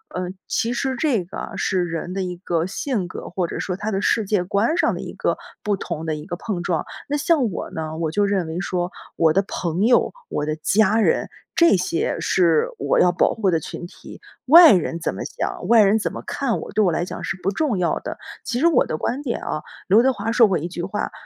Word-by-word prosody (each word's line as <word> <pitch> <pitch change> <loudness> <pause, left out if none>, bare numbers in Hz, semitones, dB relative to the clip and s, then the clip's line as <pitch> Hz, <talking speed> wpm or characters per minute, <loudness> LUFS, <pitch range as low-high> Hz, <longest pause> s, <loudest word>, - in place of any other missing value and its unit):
呃， 180 -1 -2 0.2
其 230 - 0
实 265 +2 -1
这 245 - 0
个 175 - -7
是 185 -1 0
人 175 +1 -4
的 195 - -2
一 180 -1 -4
个 170 -2 -1
性 195 0 -2
格， - - -7
或 180 0 -1
者 - - -5
说 180 - -2
他 210 +3 -3
的 195 -1 -1
世 225 - +2
界 200 -2 +1
观 210 - +1
上 - - +2
的 - - -5
一 - - -7
个 - - 0 0.2
不 210 -1 0
同 170 -4 -5
的 160 -1 -1
一 150 0 -8
个 175 -1 -5
碰 180 -3 -4
撞。 170 -3 -1 0.2
那 290 - +1
像 285 -6 +2
我 - - -5
呢， 160 0 -5
我 165 -1 -1
就 205 +6 +1
认 195 -4 0
为 160 +2 -4
说 180 -2 -2 0.3
我 160 -2 +4
的 195 - +3
朋 175 -2 -3
友， 245 +1 +3 0.2
我 150 - -2
的 155 0 -1
家 205 +6 +2
人， - - +2 0.3
这 335 -8 +5
些 175 -2 -1
是 165 -2 +2
我 140 - +1
要 180 - +5
保 175 - +2
护 205 -4 +1
的 165 - +2
群 165 - -7
体， 175 - -12 0.2
外 330 +5 +9
人 175 -4 +1
怎 - - -1
么 - - -6
想， - - -4
外 230 -2 +7
人 205 +2 +3
怎 - - -3
么 - - -7
看 265 -5 -1
我， - - -8
对 215 - +1
我 175 - +2
来 170 - 0
讲 180 - -6
是 - - -2
不 195 - +1
重 255 -1 0
要 175 -2 0
的， - - -6 0.3
其 245 +1 -2
实 335 - +5
我 320 -7 +4
的 155 - -3
观 255 - -2
点 255 -5 -3
啊， 155 - -3 0.3
刘 210 +5 +7
德 265 +2 +3
华 225 - -3
说 230 -1 +6
过 190 -3 +1
一 170 +4 -4
句 175 -1 -5
话， 200 +3 -3
190 Hz, 265 characters per minute, -22 LUFS, 170-225 Hz, 0.3 s, 外